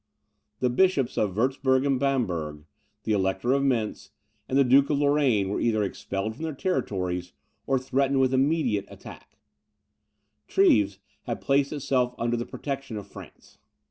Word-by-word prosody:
The 125 -1 +2
bishops 140 -4 +2
of 100 -4 0
Wurtzburg 130 +3 +1
and 135 -2 +1
Bamberg, 90 - -1 0.4
the 110 - -2
Elector 95 +4 +1
of 140 - +2
Mentz, 120 -6 -1 0.4
and 130 - +1
the 140 - +6
Duke 135 +2 +4
of 145 - +1
Lorraine, 140 -9 +2
were 100 - -2
either 110 -2 +1
expelled 100 +2 -4
from 125 - -13
their 160 -3 -3
territories, 90 - -2 0.3
or 135 - +2
threatened 135 +1 0
with 130 0 +2
immediate 130 -7 +1
attack; - - -13 1.1
Treves 105 - +3 0.3
had - - -3
placed 140 0 +1
itself 130 -4 0
under 120 +1 0
the 120 +1 -4
protection 135 -5 -5
of 105 - -7
France. - - -14
130 Hz, 150 wpm, -26 LUFS, 105-140 Hz, 1.1 s, the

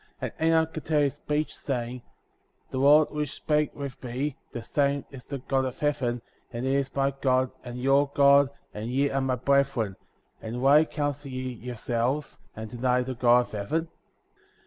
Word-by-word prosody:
^ - - -30 0.2
43. 160 - -3
And - - +5
Enoch 160 0 +2
continued 155 -1 +1
his 140 - +1
speech, 150 +1 -2
saying: 125 -2 -3 0.7
The 130 - -2
Lord 145 +3 +6
which 150 -2 -3
spake 150 -1 0
with 140 -3 -7
me, 130 +3 -3 0.2
the 120 - -6
same 140 +1 0
is 130 -3 -10
the 140 - -5
God 135 +1 0
of 130 -1 -4
heaven, 140 -6 -1 0.3
and 120 +1 -4
he 135 - +1
is 140 -1 -1
my 135 0 +2
God, 130 -1 +2
and 125 -1 -7
your 135 +2 +3
God, 140 0 +6 0.2
and 105 +2 -5
ye 140 +3 +1
are 135 - 0
my 130 -1 +1
brethren, 125 -6 +1 0.5
and 115 +2 -5
why 145 +3 +6
counsel 145 -2 -3
ye 130 -1 -4
yourselves, 125 +4 -2 0.2
and 110 0 -7
deny 125 +1 +1
the 130 +1 -4
God 125 0 +5
of 120 - -8
heaven? 155 +11 -2
135 Hz, 185 wpm, -27 LUFS, 125-145 Hz, 0.7 s, Lord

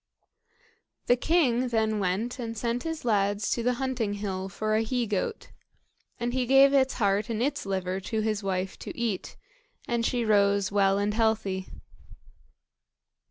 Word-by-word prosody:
The 245 - +4
king 255 -4 +2
then 220 -2 0
went 205 +7 -1
and 230 -2 -5
sent 235 +2 -1
his 325 -4 -5
lads 205 -2 +1
to 235 - 0
the 250 +2 +1
hunting 240 -5 -2
hill 195 -2 -4
for 215 +2 -2
a 215 - +3
he 240 +2 -1
goat, 215 - -3 0.7
and 240 +1 -2
he 255 -1 0
gave 270 +2 +6
its 265 -1 +3
heart 205 -1 +1
and 225 -2 -2
its 255 -4 -1
liver 190 -1 -2
to 220 +3 -2
his 215 -1 -1
wife 190 -1 -3
to - - -8
eat; 225 -6 -3 0.5
and 235 -1 0
she 240 0 0
rose 200 -2 +3
well 195 -1 +3
and 205 +1 0
healthy. 215 -4 0
220 Hz, 160 wpm, -27 LUFS, 200-245 Hz, 0.7 s, gave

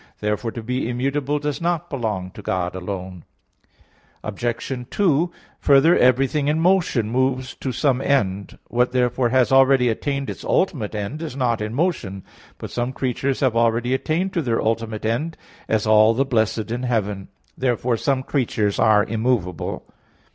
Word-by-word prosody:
Therefore 105 +2 -1
to 115 - -6
be 125 +1 -2
immutable 140 +3 -1
does 150 +1 -3
not 170 -1 -1
belong 105 -9 -3
to 105 - -11
God 90 -2 -2
alone. 95 -1 -6 1.0
Obj. 120 +4 -3
2: 175 -3 +2 0.3
Further, 145 +5 +5
everything 135 +3 +3
in 150 +2 +1
motion 170 - +2
moves 130 0 0
to 130 - -3
some 130 0 +1
end. 100 -9 0
What 125 +1 +1
therefore 125 -1 +1
has 130 0 +3
already 135 -2 +5
attained 140 +4 -2
its - - -6
ultimate 130 - 0
end, 105 +9 -4
is 155 -6 -5
not 120 -5 0
in 105 +2 -3
motion. 125 - -1 0.3
But - - -8
some 120 +2 -2
creatures 130 +1 -2
have 130 -4 +2
already 115 +2 +2
attained 170 +8 -1
to 170 - 0
their 120 -6 0
ultimate 110 -1 -2
end; 140 +9 -1 0.3
as 110 -1 +1
all 110 +1 +5
the 135 +3 +2
blessed 110 -3 0
in 120 +1 -2
heaven. 105 -6 -1 0.3
Therefore 125 -1 0
some 130 +3 0
creatures 110 -7 -1
are 105 -1 +5
immovable. 110 -6 -2
125 Hz, 155 wpm, -22 LUFS, 110-135 Hz, 1.0 s, Further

